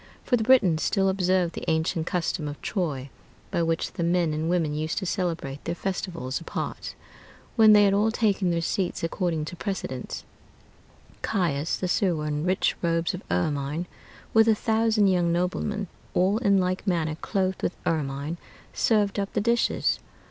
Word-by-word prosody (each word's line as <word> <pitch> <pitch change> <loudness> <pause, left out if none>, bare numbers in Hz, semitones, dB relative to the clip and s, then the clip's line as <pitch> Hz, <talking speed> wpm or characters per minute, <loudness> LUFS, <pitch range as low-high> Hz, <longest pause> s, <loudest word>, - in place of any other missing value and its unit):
For 250 - +2
the 225 - 0
Britons 210 -10 +4
still 195 -2 +2
observed 185 -2 +1
the - - -6
ancient 160 +1 0
custom 170 -4 -1
of 145 0 -6
Troy, 140 -8 -2 0.4
by - - +1
which 165 0 -1
the 170 - -2
men 170 -2 +2
and 155 +2 -1
women 165 -4 +1
used 155 +1 -2
to 195 - -1
celebrate 165 -7 -2
their 170 - -3
festivals 170 -7 -3
apart. - - -5 0.6
When 220 -2 +7
they 205 0 +7
had 200 -1 +4
all 210 +2 +3
taken 205 -5 +1
their 170 -1 0
seats 180 +1 -1
according 165 -2 -1
to 175 - -7
precedence, 170 -10 -4 1.0
Caius, 165 -7 0
the 185 - -2
sewer, 175 -4 +1
in 150 +1 -2
rich 185 +1 +1
robes 165 -1 +1
of - - -5
ermine, 140 - -1 0.5
with 225 0 +6
a 220 - +5
thousand 220 -1 +2
young 180 -3 +3
noblemen, 185 +4 -1 0.3
all 190 +4 +3
in 200 -5 +3
like 185 +2 -1
manner 165 -4 +1
clothed 190 +3 -2
with 175 - -2
ermine, 145 +1 -1 0.4
served 210 -3 +2
up 200 0 -2
the - - +1
dishes. 235 +2 +1
180 Hz, 165 wpm, -26 LUFS, 160-200 Hz, 1.0 s, When